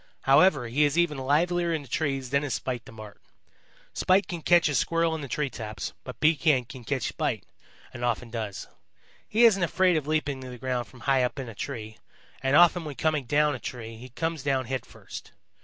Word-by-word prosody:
However, 140 -1 +4
he 135 +6 +2
is 145 +2 +2
even 165 -5 +2
livelier 170 +6 +1
in 160 -3 -1
the - - -14
trees 135 -3 -2
than 140 +1 +2
is 145 - -1
Spite 125 -3 -4
the - - -12
Marten. 110 -2 -11 0.7
Spite 190 +2 +3
can 175 -3 -5
catch 175 0 +4
a 145 - -1
Squirrel 165 +4 +1
in 160 - -4
the 140 - -5
tree 145 +1 -2
tops, 110 -2 -6
but - - -9
Pekan 150 -4 +3
can 125 +1 -10
catch 130 -1 -2
Spite, - - -2 0.5
and 120 - -7
often 120 -1 -1
does. 110 -4 -5 0.6
He 230 +3 +5
isn't 200 -4 +5
afraid 180 0 +3
of 150 -2 -3
leaping 150 -3 -1
to 130 - -8
the 125 - -8
ground 125 -1 -2
from 125 - -16
high 135 -2 +3
up 125 +3 -1
in 135 -2 -5
a 115 - -8
tree, 110 -1 -6 0.4
and 135 +1 +2
often 175 +1 +6
when 150 -3 -6
coming 155 -3 0
down 150 +3 +2
a 130 - -5
tree 115 -1 -7
he 125 +3 -11
comes 160 +4 -3
down 135 -2 0
headfirst. 130 +2 -7
140 Hz, 210 wpm, -27 LUFS, 125-160 Hz, 0.7 s, often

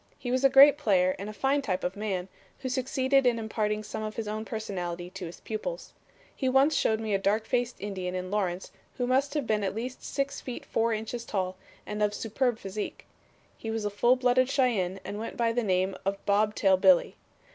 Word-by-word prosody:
He 245 - -4
was 255 +1 +1
a 275 - +7
great 280 +2 +8
player 185 -7 +3
and 200 +2 -5
a - - -4
fine 270 +6 +1
type 185 -8 -2
of 180 +1 -2
man, 195 -3 -3 0.3
who 260 - -3
succeeded 260 +1 +2
in 240 -1 +3
imparting 215 -1 -1
some 215 - -5
of 215 0 -4
his 225 -2 -4
own 215 +1 -3
personality 180 -6 -4
to 180 - -6
his 170 - -11
pupils. - - -5 0.4
He 260 - 0
once 270 +4 +4
showed 220 -5 +2
me 220 -2 -2
a 195 - +2
dark 210 +3 +1
faced 245 0 0
Indian 185 -3 -4
in 185 0 -4
Lawrence 190 -3 -2 0.3
who 250 - 0
must 270 +4 +1
have 290 -4 0
been 215 -1 0
at 195 - -2
least 245 +3 -5
six 275 0 -2
feet 250 - -7
four 230 +1 +1
inches 225 +2 -3
tall 185 -4 -2 0.3
and 210 0 -4
of 210 0 +2
superb 235 +2 0
physique. 195 0 -6 0.5
He 225 - -7
was 220 -1 -2
a 205 - -1
full 240 +5 +4
blooded 255 0 +3
Cheyenne 220 -9 +1
and 205 - -5
went 225 - -6
by 235 -1 +2
the 245 - +1
name 190 -2 +1
of 195 +1 -1
Bob 210 +1 +2
Tail 190 -2 +4
Billy. 185 -2 +4
215 Hz, 215 wpm, -28 LUFS, 195-250 Hz, 0.5 s, great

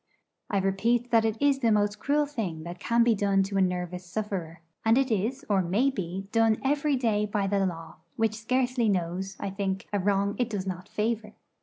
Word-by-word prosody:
I 200 - 0
repeat 225 +6 +1
that 225 -1 +4
it 220 0 -1
is 280 -1 +3
the 230 -4 +2
most 205 0 +1
cruel 295 +1 +2
thing 200 - -4
that 175 +1 -7
can 235 0 +3
be 235 -1 +4
done 195 -2 +2
to 195 +1 -3
a - - +4
nervous 180 -1 -1
sufferer: 180 -3 -4 0.2
and 225 +2 +4
it 265 -2 +2
is, 235 +7 -1
or 200 -2 +3
may 205 +10 +2
be, 190 -3 -5
done 225 -1 +3
every 285 +1 +2
day 215 -5 +1
by 205 -1 -1
the 195 0 +1
Law, 165 -2 -7 0.2
which 225 -1 +1
scarcely 245 +1 0
knows, 190 +1 -2
I 195 - -3
think, 195 -1 -3
a 205 - +2
wrong 200 +1 +1
it 245 -1 +1
does 200 -4 -3
not 185 +1 -5
favour. 215 0 -2
205 Hz, 205 wpm, -27 LUFS, 190-230 Hz, 0.2 s, that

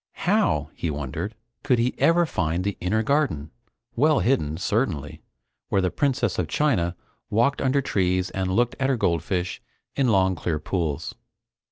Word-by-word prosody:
How, - - +2
he 85 - -3
wondered, 75 - -4 0.3
could 125 -3 +2
he 120 +2 +1
ever 170 +1 +4
find 85 - -1
the 100 -1 -1
inner 110 +5 +1
garden 95 - 0 0.4
well 150 +4 +4
hidden, 80 - +1
certainly 95 - -1 0.5
where - - +2
the 90 -1 +1
Princess 130 -7 0
of 90 - 0
China 90 - +1 0.3
walked 120 +6 +2
under 135 +1 +2
trees 95 -5 0
and 95 -1 -2
looked 120 +5 +1
at 135 0 +1
her 135 - +2
goldfish 90 -1 -1 0.3
in 135 -2 +2
long 95 -4 +3
clear 80 -2 -2
pools? 80 -1 -2
95 Hz, 155 wpm, -24 LUFS, 85-130 Hz, 0.5 s, ever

